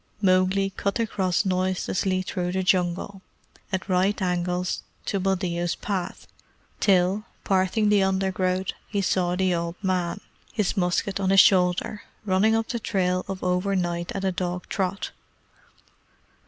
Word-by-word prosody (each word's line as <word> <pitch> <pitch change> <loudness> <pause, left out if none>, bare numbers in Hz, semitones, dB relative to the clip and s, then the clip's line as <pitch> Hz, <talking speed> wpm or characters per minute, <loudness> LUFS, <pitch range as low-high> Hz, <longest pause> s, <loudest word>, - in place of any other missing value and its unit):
Mowgli 190 0 +3
cut 200 +1 -2
across 195 -4 0
noiselessly 185 0 0
through 180 -1 -3
the 190 0 0
Jungle, 185 +1 0 0.5
at 190 0 -2
right 190 +2 +2
angles 180 -1 -1 0.2
to 200 - -1
Buldeo's 180 -2 0
path, 190 -3 -4 0.5
till, 195 +2 +3 0.2
parting 195 +2 +2
the 205 -1 +4
undergrowth, 190 -1 0 0.2
he 205 - -2
saw 180 -1 +1
the 185 0 +1
old 170 0 -2
man, 185 0 0 0.3
his 210 -3 0
musket 185 +1 0
on 190 -1 0
his 195 0 +6
shoulder, 185 +2 +2 0.2
running 205 +3 +3
up 225 0 -1
the 235 - -2
trail 185 -4 0
of 195 -1 -5
overnight 180 -2 0
at 195 0 -2
a 190 - +2
dog 180 0 -3
trot. 190 0 -2
185 Hz, 135 wpm, -25 LUFS, 180-195 Hz, 0.5 s, his